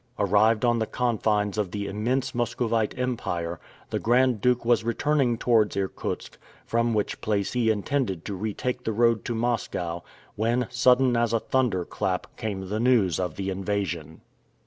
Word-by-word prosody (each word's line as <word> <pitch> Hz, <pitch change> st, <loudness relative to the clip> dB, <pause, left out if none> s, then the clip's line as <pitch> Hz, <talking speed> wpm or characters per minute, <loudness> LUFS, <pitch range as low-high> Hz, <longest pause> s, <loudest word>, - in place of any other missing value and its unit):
Arrived 105 Hz, +3 st, +3 dB
on 120 Hz, -1 st, +3 dB
the 110 Hz, -, -1 dB
confines 110 Hz, -4 st, 0 dB
of 100 Hz, -3 st, 0 dB
the 100 Hz, +2 st, -4 dB
immense 115 Hz, +6 st, -1 dB
Muscovite 115 Hz, -2 st, -1 dB
Empire, 85 Hz, -10 st, -2 dB, 0.3 s
the -, -, 0 dB
Grand 125 Hz, -1 st, +2 dB
Duke 125 Hz, 0 st, +2 dB
was 120 Hz, -1 st, +3 dB
returning 125 Hz, +1 st, +1 dB
towards 110 Hz, -4 st, +2 dB
Irkutsk, 95 Hz, -1 st, -4 dB, 0.3 s
from 115 Hz, 0 st, +1 dB
which 105 Hz, -, -1 dB
place 100 Hz, -2 st, -1 dB
he 120 Hz, -3 st, +2 dB
intended 105 Hz, -, -1 dB
to 100 Hz, -, -4 dB
retake 110 Hz, +6 st, -3 dB
the 110 Hz, -, -1 dB
road 115 Hz, 0 st, +3 dB
to 120 Hz, -, -2 dB
Moscow, 105 Hz, -7 st, -2 dB, 0.3 s
when, 120 Hz, +3 st, +1 dB
sudden 125 Hz, 0 st, +4 dB
as 115 Hz, -1 st, +1 dB
a 115 Hz, -, +3 dB
thunder 115 Hz, -9 st, 0 dB
clap, 90 Hz, -1 st, -3 dB
came 95 Hz, -3 st, -4 dB
the 105 Hz, +3 st, -2 dB
news 110 Hz, -9 st, +3 dB
of 90 Hz, -4 st, -2 dB
the 95 Hz, 0 st, -3 dB
invasion. 95 Hz, -5 st, -3 dB
110 Hz, 160 wpm, -26 LUFS, 100-120 Hz, 0.3 s, sudden